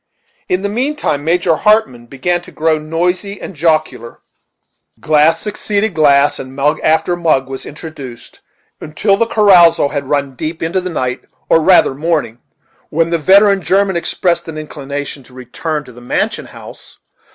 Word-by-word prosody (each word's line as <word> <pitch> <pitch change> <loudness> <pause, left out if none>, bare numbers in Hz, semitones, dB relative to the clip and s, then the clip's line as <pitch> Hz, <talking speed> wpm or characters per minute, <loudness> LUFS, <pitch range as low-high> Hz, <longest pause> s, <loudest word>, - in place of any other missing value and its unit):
In 180 +1 0
the - - 0
mean 255 +9 -2
time, 145 - -2
Major 170 0 +1
Hartmann 210 - +1
began 175 +8 -2
to - - -15
grow 160 0 0
noisy 180 +6 -2
and - - -8
jocular; 155 -7 -1 0.8
glass 155 +2 +3
succeeded 210 0 -2
glass, 145 -2 +3
and 130 0 -9
mug 145 +3 +1
after 160 +3 +1
mug 155 -6 +1
was 135 0 -7
introduced, 145 -6 -10 0.4
until 195 +7 0
the 230 +3 0
carousal 175 -9 +5
had 140 -1 -4
run 140 -2 -1
deep 155 +6 -5
into 175 +3 -1
the 185 - -4
night, 130 -6 -3 0.2
or 165 - +4
rather 180 -4 +4
morning; 150 -5 -2 0.5
when 165 +2 0
the 170 - +1
veteran 195 +4 +4
German 195 +1 +1
expressed 170 0 -1
an 160 -1 -7
inclination 145 -2 -6
to 125 0 -18
return 150 +5 -4
to 125 - -14
the 120 0 -14
mansion 120 - -2
house. - - -13
160 Hz, 160 wpm, -15 LUFS, 140-180 Hz, 0.8 s, carousal